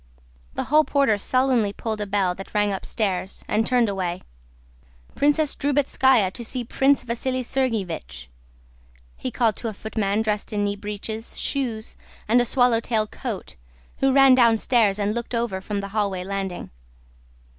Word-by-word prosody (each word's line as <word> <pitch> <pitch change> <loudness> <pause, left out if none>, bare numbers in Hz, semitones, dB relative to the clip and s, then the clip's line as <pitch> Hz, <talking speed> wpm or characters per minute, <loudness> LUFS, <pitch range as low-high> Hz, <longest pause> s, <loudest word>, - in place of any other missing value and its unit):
The - - -1
hall 305 +2 +4
porter 275 -9 +2
sullenly 255 -3 +1
pulled 220 -1 -4
a 205 - -3
bell 195 -2 +1
that 195 +3 -11
rang 205 -1 +2
upstairs, 190 -1 -3
and 220 +1 +1
turned 245 -2 +3
away. 185 -3 -3 0.9
"Princess 295 +1 +2
Drubetskáya 265 -7 +2
to 240 - -7
see 245 +2 -4
Prince 270 +4 +2
Vasíli 255 +2 -2
Sergéevich," 200 - -2 0.9
he - - -4
called 225 -4 +1
to 235 - -4
a 220 - -3
footman 215 0 -1
dressed 210 0 -2
in 205 -1 0
knee 205 0 0
breeches, 210 +2 -6
shoes, 235 -6 -2 0.3
and 240 +3 +4
a - - +1
swallow 245 -1 +3
tail 225 -2 0
coat, 220 -1 -6 0.4
who 270 0 +2
ran 270 -1 +7
downstairs 230 -3 +4
and 205 0 0
looked 235 +1 -4
over 230 -5 -1
from 200 +1 -3
the 200 - -6
halfway 200 -3 -1
landing. 195 -1 -4
220 Hz, 155 wpm, -23 LUFS, 200-250 Hz, 0.9 s, ran